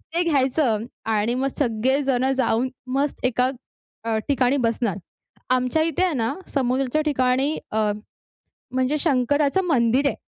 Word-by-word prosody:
ते 350 - +3
घ्यायचं 260 -5 +1 0.3
आणि 215 +3 +1
मग 265 +2 0
सगळे 260 +2 +1
जण 265 0 +1
जाऊन 255 -1 +1 0.3
मस्त 280 -2 -1
एका 250 +1 +2 0.6
अ, 225 -1 0
ठिकाणी 270 -1 +2
बसणार. 230 -5 0 0.5
आमच्या 255 +5 +2
इथे 330 +3 0
आहे 360 - +1
ना 230 -4 -1
समुद्राच्या 265 +2 0
ठिकाणी 265 +1 +1
अ, 215 -1 +1 0.8
म्हणजे 260 +4 +1
शंकराचं 285 +5 +2
मंदिर 260 -3 +2
आहे. - - -3
260 Hz, 135 wpm, -23 LUFS, 240-285 Hz, 0.8 s, ते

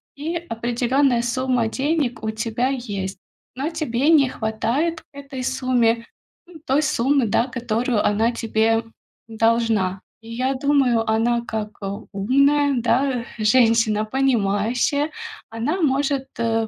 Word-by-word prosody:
и 315 +4 -4
определённая 240 +2 +1
сумма 250 -1 0
денег 270 -2 -1
у 220 - -1
тебя 225 +3 -1
есть. 200 -8 -4 0.4
Но 275 +4 -2
тебе 300 -4 -1
не 285 -5 +5
хватает 240 +10 -1
к - - -32
этой 275 -2 -7
сумме, 235 -3 +1 0.4
м, 345 -3 -13
той 275 +3 +2
суммы, 275 -2 +1
да, 230 +4 +1
которую 240 -2 -1
она 220 +3 +2
тебе 225 -1 +1 0.4
должна. 225 -4 +1 0.2
И 225 - -13
я 255 +3 0
думаю, 260 -5 +2
она, 235 +2 +2
как, 215 -1 -3
э, 195 - -4 0.3
умная, 280 +7 +2
да, 245 0 +1
женщина, 225 -1 +3
понимающая, 245 +3 +1 0.4
она 250 +12 -2
может, 275 -1 +1
э, 225 -1 0
240 Hz, 125 wpm, -22 LUFS, 225-270 Hz, 0.4 s, не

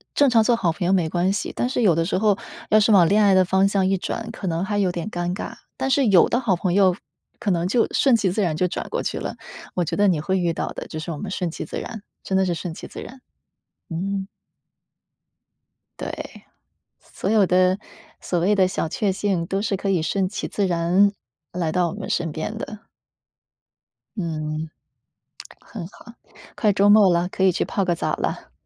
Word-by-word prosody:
正 285 -1 +5
常 230 -2 +5
做 235 +2 +3
好 180 -8 +1
朋 175 +2 -4
友 190 - +3
没 170 -4 +2
关 180 +3 +1
系， 205 - -3
但 - - -1
是 250 -1 -1
有 190 -7 +5
的 165 0 +1
时 185 - 0
候 205 0 +2 0.3
要 215 - +6
是 215 0 +4
往 180 -3 +6
恋 210 +2 +4
爱 200 -2 +5
的 185 0 +5
方 190 +2 +3
向 195 -1 +1
一 190 0 +2
转， 230 +5 -4
可 200 -4 -6
能 165 +1 -1
还 205 +2 -2
有 195 -2 +2
点 175 +3 -4
尴 175 +1 -2
尬， - - -5 0.2
但 265 - -2
是 270 0 +3
有 185 -4 +5
的 240 - +1
好 220 -8 +1
朋 180 0 -1
友 190 -2 +4 0.4
可 215 -4 0
能 170 -1 0
就 230 +5 +2
顺 270 -4 +4
其 205 -5 +1
自 210 - -1
然 170 -5 0
就 180 +2 0
转 - - -4
过 - - -2
去 - - -2
了， - - -5 0.4
我 180 - 0
觉 165 - -3
得 205 0 +4
你 165 -5 +2
会 190 +3 0
遇 170 -2 0
到 - - -3
的， - - -7
就 160 - -7
是 165 +2 -5
我 155 - -5
们 205 - -6
顺 180 -3 -2
其 - - -6
自 - - -6
然， 220 -4 -8 0.2
真 190 - 0
的 190 - +3
是 180 - 0
顺 170 0 -5
其 - - -9
自 - - -9
然， 260 +1 -10 0.7
嗯。 190 +3 -3 1.7
对， - - -7 0.6
所 - - -5
有 210 -3 +4
的， 185 +1 +3 0.4
所 175 - -1
谓 185 +5 +2
的 190 -2 +4
小 180 - -2
确 195 +4 0
幸 185 -3 -1
都 195 - -1
是 210 - 0
可 195 +1 -3
以 185 -4 +2
顺 190 +2 0
其 210 - -4
自 200 -2 -1
然， 180 +3 +3 0.4
来 170 -3 -2
到 180 0 +1
我 - - -6
们 205 -1 -6
身 165 -2 -1
边 160 +8 -4
的。 215 -1 -8 1.3
嗯， 155 -2 -3 0.9
很 195 -7 -8
好。 235 +3 -15 0.4
快 210 -2 +2
周 200 +1 +3
末 205 -3 +7
了， 175 +1 +1
可 190 +1 -3
以 190 - +5
去 - - -1
泡 200 - -1
个 175 -1 +1
澡 - - -2
了。 - - -4
190 Hz, 240 characters per minute, -23 LUFS, 175-205 Hz, 1.7 s, 末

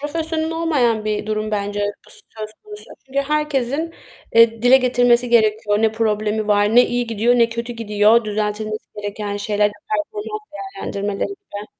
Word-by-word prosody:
profesyonel 320 +2 -2
olmayan 280 -10 +1
bir 210 0 -2
durum 215 0 -2
bence 205 0 -2 0.3
bu - - -17
söz 215 -1 -9
konusu 420 0 -11 0.2
çünkü 270 +1 -3
herkesin, 300 +1 -1 0.4
eee, 230 -1 +5
dile 250 +2 +7
getirmesi 245 -1 +3
gerekiyor, 215 -2 +2
ne 220 -1 +3
problemi 215 -1 -1
var, 205 +1 +3
ne 245 - +7
iyi 245 0 -1
gidiyor, 230 +2 +2
ne 230 - +4
kötü 235 +1 -5
gidiyor, 220 0 +3
düzeltilmesi 215 0 -3 0.2
gereken 205 0 -4
şeyler, 205 0 +1 0.2
performans 420 +8 -3
değerlendirmeleriyle. 300 - -5
230 Hz, 140 wpm, -20 LUFS, 210-280 Hz, 0.4 s, dile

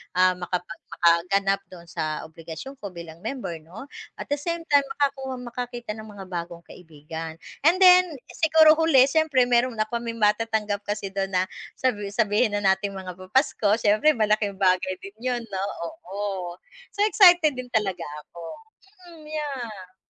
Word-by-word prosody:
ah, 185 0 +5
makapag 175 -1 -4 0.2
makaganap 195 +4 +2
dun 175 -2 -13
sa 155 -1 -3
obligasyon 165 - -9
ko 205 - -6
bilang 170 -1 -9
member 180 -6 -5
no 170 - -11 0.3
at - - -9
the 290 - +1
same 335 +2 -3
time 285 -1 +6
makakuha, 270 -2 -1
makakita 240 -1 -6
ng 220 0 -8
mga 205 -2 -10
bagong 170 0 -5
kaibigan 160 -1 -9 0.3
and 350 - +5
then 365 0 +8 0.2
siguro 315 -1 +6
huli 300 -6 +6
siyempre 305 -5 +3
meron 245 0 +2
na 215 - +1
kami 230 +1 -4
matatanggap 210 -1 +1
kasi 205 -2 -3
dun 195 0 -1
na 180 - +3 0.3
sabi 210 -6 -1
sabihin 210 +1 +1
na 205 - -4
nating 195 +1 +1
mga 185 -1 -6
papasko 205 +1 +1
siyempre 215 +6 +3
malaking 210 -2 +1
bagay 185 -1 +2
din 195 - -9
yun 245 -1 -1
no 190 +1 -2 0.2
oo, 195 - -5 0.4
so 405 - +2
excited 355 -7 +6
din 255 - -5
talaga 205 -4 0 0.2
ako, 170 - -13 0.7
mm, 320 -2 -14
yeah. 240 -12 -6
210 Hz, 155 wpm, -25 LUFS, 185-260 Hz, 0.7 s, then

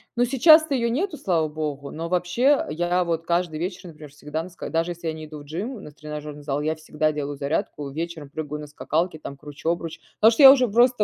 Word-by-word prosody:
Но 245 - +3
сейчас 310 +6 +6
то 295 - -3
её 235 -2 +1
нету, 305 +8 -1
слава 165 - 0
богу. 150 -2 -4
Но 165 +2 -5
вообще 180 +11 +2
я 175 +2 0
вот 165 -1 -2
каждый 170 -2 0
вечер, 180 +1 -4
например, 155 -2 -12
всегда 150 +2 -5
на 185 - -9
ска 175 - -8
даже 165 +2 0
если 170 -1 -6
я 160 - -1
не 155 0 -8
иду 150 0 -9
в 145 - -12
gym, 200 +11 -3
у - - -9
нас 150 - -11
тренажерный 150 -1 -8
зал, 145 0 -2
я 155 +1 -1
всегда 155 0 -1
делаю 145 -1 -4
зарядку, 145 0 -2
вечером 160 0 -5
прыгаю 150 0 -5
на 150 - -8
скакалке, 155 +2 -2
там 140 - -8
кручу 150 +2 -6
обруч. 165 -1 -5 0.2
Потому 220 +2 +8
что, 255 +5 +3
я 265 - +13
уже 255 -4 +2
просто, 240 +1 +4
165 Hz, 240 wpm, -24 LUFS, 150-190 Hz, 0.2 s, я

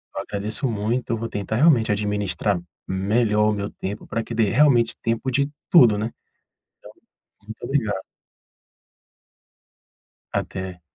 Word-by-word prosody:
eu - - -2
agradeço 105 +6 -3
muito, 115 +3 -1
eu 115 - +1
vou 115 +1 -4
tentar 105 +1 -3
realmente 130 -6 +4
administrar 105 -2 0 0.3
melhor 105 +3 +2
o - - +1
meu 100 0 -3
tempo 100 +2 -6
pra 115 - -2
que - - -7
dê 110 -3 +2
realmente 125 -3 +4
tempo 115 +3 -1
de 140 +2 +1 0.2
tudo, 120 -11 +7
né? 110 +2 -2 1.3
Então, 105 - -28
muito 110 - -8
obrigado. 110 -9 -1 2.3
Até. 95 -1 -4
110 Hz, 130 wpm, -23 LUFS, 105-120 Hz, 2.3 s, tudo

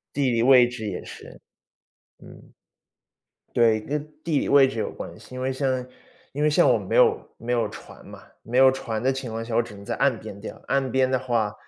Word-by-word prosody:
地 140 -3 +1
理 115 -1 +1
位 125 -1 +6
置 120 -3 -7
也 95 -3 -4
是。 - - -12 0.8
嗯。 - - -16 1.0
对， 115 -2 +4
跟 145 +6 -3 0.2
地 160 -4 +1
理 - - -2
位 140 -1 +6
置 130 -3 -5
有 - - -2
关 - - -9
系。 - - -14
因 130 - -6
为 130 +1 -1
像 130 -2 -1 0.5
因 145 - -3
为 150 - +4
像 150 - +4
我 - - +3
没 - - -3
有 455 -3 +3
没 120 +1 -4
有 115 -3 +1
船 - - -13
嘛， - - -12 0.2
没 115 +4 -5
有 130 0 +7
船 115 -4 -4
的 130 +2 +2
情 130 -2 -5
况 115 +1 -4
下， 115 0 -5
我 120 - +3
只 115 -2 -11
能 100 0 -12
在 - - -3
岸 135 -5 +1
边 105 -2 -10
钓， 110 - -9
岸 135 -1 0
边 130 -1 +2
的 130 - +2
话， 115 -5 -1
125 Hz, 240 characters per minute, -24 LUFS, 115-135 Hz, 1.0 s, 有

